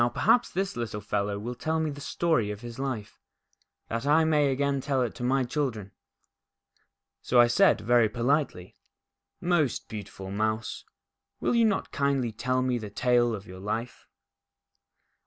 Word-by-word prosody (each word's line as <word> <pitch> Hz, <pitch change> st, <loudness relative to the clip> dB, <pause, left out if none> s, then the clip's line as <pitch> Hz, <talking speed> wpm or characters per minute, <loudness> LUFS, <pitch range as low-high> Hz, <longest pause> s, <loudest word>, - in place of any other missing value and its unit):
perhaps 245 Hz, -, +3 dB
this 195 Hz, +2 st, -2 dB
little 115 Hz, -3 st, -4 dB
fellow 105 Hz, 0 st, -2 dB
will 115 Hz, +4 st, -4 dB
tell 160 Hz, +6 st, -1 dB
me 160 Hz, -1 st, -1 dB
the 145 Hz, 0 st, -9 dB
story 145 Hz, -8 st, 0 dB
of 105 Hz, 0 st, -6 dB
his 120 Hz, 0 st, -8 dB
life, 130 Hz, -7 st, -4 dB, 0.7 s
that 115 Hz, +1 st, -3 dB
I 150 Hz, +3 st, +4 dB
may 150 Hz, -3 st, +3 dB
again 140 Hz, 0 st, 0 dB
tell 135 Hz, -2 st, 0 dB
it 120 Hz, -, -3 dB
to 125 Hz, -, -7 dB
my 130 Hz, +2 st, +2 dB
children." 120 Hz, -7 st, -3 dB, 1.3 s
So 125 Hz, -, +3 dB
I 120 Hz, -, +9 dB
said, 120 Hz, -2 st, +4 dB
very 115 Hz, 0 st, +4 dB
politely: 120 Hz, -, -1 dB, 0.4 s
" -, -, -59 dB, 0.2 s
Most 150 Hz, -7 st, 0 dB
beautiful 100 Hz, -2 st, -7 dB
Mouse, 110 Hz, +2 st, -2 dB, 0.5 s
will -, -, 0 dB
you 235 Hz, -1 st, +4 dB
not 205 Hz, -3 st, 0 dB
kindly 140 Hz, -4 st, 0 dB
tell 125 Hz, +3 st, -1 dB
me 125 Hz, -1 st, 0 dB
the 105 Hz, -2 st, -7 dB
tale 120 Hz, +1 st, +2 dB
of 100 Hz, -1 st, -9 dB
your 95 Hz, 0 st, -10 dB
life 110 Hz, +5 st, -4 dB
120 Hz, 160 wpm, -27 LUFS, 110-140 Hz, 1.3 s, I